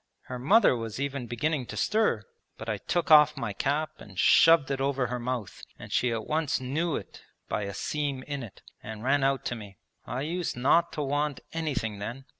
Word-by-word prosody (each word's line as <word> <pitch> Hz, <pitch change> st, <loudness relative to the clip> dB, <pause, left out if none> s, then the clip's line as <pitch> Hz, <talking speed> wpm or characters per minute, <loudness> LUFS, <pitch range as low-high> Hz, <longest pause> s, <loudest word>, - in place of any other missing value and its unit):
Her 125 Hz, -1 st, -7 dB
mother 195 Hz, -, +5 dB
was 115 Hz, 0 st, -5 dB
even 140 Hz, -3 st, -3 dB
beginning 130 Hz, +3 st, -1 dB
to -, -, -7 dB
stir, 210 Hz, -, +1 dB, 0.3 s
but 110 Hz, -, -8 dB
I 105 Hz, -2 st, -2 dB
took 170 Hz, -, -1 dB
off 150 Hz, -1 st, +7 dB
my 110 Hz, -4 st, -3 dB
cap 145 Hz, +8 st, -1 dB
and 95 Hz, -3 st, -13 dB
shoved 165 Hz, -, +6 dB
it 135 Hz, -1 st, -1 dB
over 135 Hz, -1 st, +1 dB
her 125 Hz, +1 st, -3 dB
mouth; 120 Hz, -3 st, -4 dB, 0.2 s
and -, -, -11 dB
she 125 Hz, -, +2 dB
at 115 Hz, -1 st, -3 dB
once 155 Hz, -1 st, 0 dB
knew 145 Hz, +6 st, -1 dB
it -, -, -7 dB, 0.3 s
by 105 Hz, -, -2 dB
a 100 Hz, -, -5 dB
seam 145 Hz, -3 st, -2 dB
in 140 Hz, -1 st, -4 dB
it, 115 Hz, -6 st, -11 dB, 0.2 s
and 110 Hz, 0 st, -8 dB
ran 135 Hz, +2 st, +2 dB
out 135 Hz, 0 st, +1 dB
to 120 Hz, -, -2 dB
me. 100 Hz, -4 st, -10 dB, 0.3 s
I 125 Hz, +2 st, -4 dB
used 170 Hz, 0 st, -2 dB
not 155 Hz, +7 st, +3 dB
to 150 Hz, -, -2 dB
want 145 Hz, 0 st, -1 dB
anything 130 Hz, -11 st, -2 dB
then. 120 Hz, +6 st, -6 dB
135 Hz, 205 wpm, -28 LUFS, 120-150 Hz, 0.3 s, off